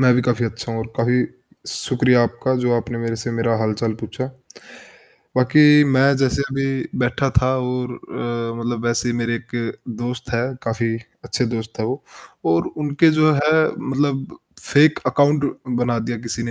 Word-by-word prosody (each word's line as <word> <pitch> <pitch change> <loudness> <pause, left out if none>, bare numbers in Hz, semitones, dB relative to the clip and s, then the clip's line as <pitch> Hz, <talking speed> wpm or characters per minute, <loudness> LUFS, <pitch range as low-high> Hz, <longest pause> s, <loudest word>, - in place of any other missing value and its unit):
मैं 125 -2 +5
भी 125 - +2
काफ़ी 120 -1 +1
अच्छा 115 +1 -5
हूँ 115 - -3
और 110 - -4
काफ़ी 125 +2 +2 0.4
शुक्रिया 125 -1 +2
आपका 120 +2 0
जो 125 -1 +1
आपने 115 0 -3
मेरे 115 0 -2
से 115 +1 -4
मेरा 115 -1 0
हाल-चाल 110 +1 0
पूछा। 130 - -5 1.1
बाकी 150 +3 +6
मैं 135 0 +4
जैसे 135 +1 +1
अभी 135 0 -1 0.3
बैठा 125 +2 +1
था 130 +1 +1
और 125 0 -2
अ, 120 -1 -5
मतलब 120 0 -3
वैसे 120 +1 +1
ही 120 - 0
मेरे 115 0 -1
एक 115 0 -4 0.3
दोस्त 120 0 -5
है 125 +3 -1
काफ़ी 115 0 -1 0.3
अच्छे 125 - -1
दोस्त 115 -1 -5
है 110 - 0
वो। 135 +3 -3 0.4
और 85 +1 +2
उनके 150 +2 +3
जो 155 0 +5
है 150 +2 +2 0.3
मतलब 135 0 -1 0.3
फेक 150 +2 +4
अकाउंट 145 +3 +3 0.3
बना 120 -1 0
दिया 115 +1 -3
किसी 115 0 -3
ने 115 - -3
125 Hz, 170 wpm, -21 LUFS, 115-135 Hz, 1.1 s, बाकी